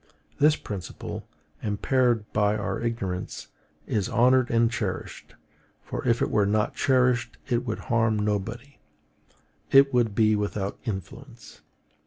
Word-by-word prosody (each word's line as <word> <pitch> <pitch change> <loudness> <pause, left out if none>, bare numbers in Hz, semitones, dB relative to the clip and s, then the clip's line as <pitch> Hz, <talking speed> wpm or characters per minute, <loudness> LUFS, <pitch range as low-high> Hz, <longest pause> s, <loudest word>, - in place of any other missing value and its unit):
This 150 +1 +5
principle, 100 - -7 0.3
impaired 115 +2 +1
by 105 0 +2
our 100 - -3
ignorance, 100 -6 -4 0.4
is 105 -3 -1
honored 125 +1 +4
and 115 0 +3
cherished; 105 -6 -5 0.5
for - - -5
if 115 -1 +3
it - - -1
were 105 -2 +3
not 105 +1 +1
cherished 125 -3 +1
it 125 -1 -1
would 110 - -2
harm 115 -2 +1
nobody, 110 +6 -3 0.9
it 135 0 +6
would 115 -4 +2
be 110 -1 +4
without 100 -1 -3
influence. 95 -6 -8
115 Hz, 125 wpm, -26 LUFS, 105-125 Hz, 0.9 s, it